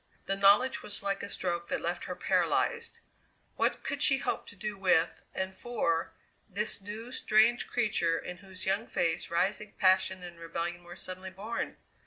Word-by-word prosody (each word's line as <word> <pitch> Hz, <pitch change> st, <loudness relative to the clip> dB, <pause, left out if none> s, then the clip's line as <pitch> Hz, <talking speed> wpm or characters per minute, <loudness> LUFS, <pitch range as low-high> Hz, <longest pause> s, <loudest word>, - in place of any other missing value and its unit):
The 195 Hz, -, 0 dB
knowledge 200 Hz, +6 st, +5 dB
was 205 Hz, -, -3 dB
like 195 Hz, 0 st, -1 dB
a 200 Hz, -, -5 dB
stroke 175 Hz, -3 st, -2 dB
that -, -, -1 dB
left -, -, -2 dB
her -, -, -4 dB
paralyzed. 470 Hz, -1 st, +1 dB, 0.5 s
What -, -, +1 dB
could -, -, -3 dB
she 270 Hz, -, +6 dB
hope -, -, -2 dB
to -, -, -11 dB
do 210 Hz, +1 st, -4 dB
with, 180 Hz, -4 st, +2 dB
and 190 Hz, 0 st, -2 dB
for, 170 Hz, -7 st, 0 dB, 0.4 s
this 205 Hz, +1 st, 0 dB
new, 215 Hz, +5 st, -7 dB
strange 230 Hz, 0 st, +3 dB
creature 200 Hz, -8 st, +1 dB
in 180 Hz, -, -6 dB
whose 190 Hz, -1 st, -10 dB
young 200 Hz, +4 st, +1 dB
face 165 Hz, 0 st, 0 dB
rising 200 Hz, +5 st, 0 dB
passion 185 Hz, -1 st, +3 dB
and 175 Hz, -1 st, -9 dB
rebellion 170 Hz, +1 st, -4 dB
were 175 Hz, 0 st, -10 dB
suddenly 185 Hz, +1 st, -7 dB
born? 200 Hz, +5 st, -4 dB
190 Hz, 170 wpm, -31 LUFS, 175-210 Hz, 0.5 s, she